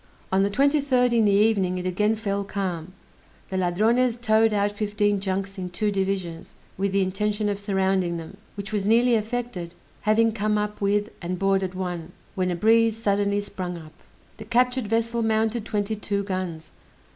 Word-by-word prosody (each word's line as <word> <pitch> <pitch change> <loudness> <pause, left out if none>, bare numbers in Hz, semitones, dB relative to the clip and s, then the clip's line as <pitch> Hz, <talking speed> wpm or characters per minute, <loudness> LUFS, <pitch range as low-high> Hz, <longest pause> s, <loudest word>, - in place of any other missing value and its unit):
On 190 +1 +3
the 200 - +2
23d, 270 0 +2
in 230 -2 +4
the 205 - +4
evening, 200 -3 +3
it 180 - -4
again 210 +4 +1
fell 200 -2 -2
calm; 185 -3 -4 0.6
the 190 - -4
Ladrones 220 +7 +2
towed 225 -1 +3
out 205 0 +1
fifteen 205 -1 0
junks 195 0 -3
in 180 -1 -4
two 205 +4 -1
divisions, 190 -4 -3 0.2
with 195 +1 -1
the 195 0 +2
intention 210 +3 -1
of 200 -1 -2
surrounding 190 -3 0
them, 165 +4 -9 0.2
which 200 +2 -6
was 200 -1 0
nearly 235 +3 +4
effected, 220 -6 -2 0.3
having 225 +1 +3
come 215 -1 0
up 210 0 -3
with 205 +2 +1
and 180 +1 -3
boarded 195 -1 +1
one, 175 -2 -4 0.2
when 185 -1 0
a 175 - -1
breeze 225 +4 +3
suddenly 205 -2 +1
sprung 180 -3 -5
up. 155 -2 -12 0.4
The 220 - -9
captured 250 +1 +1
vessel 230 +2 0
mounted 220 0 0
twenty 210 -1 -1
two 200 -1 -2
guns. 185 -5 -4
205 Hz, 170 wpm, -25 LUFS, 190-220 Hz, 0.6 s, in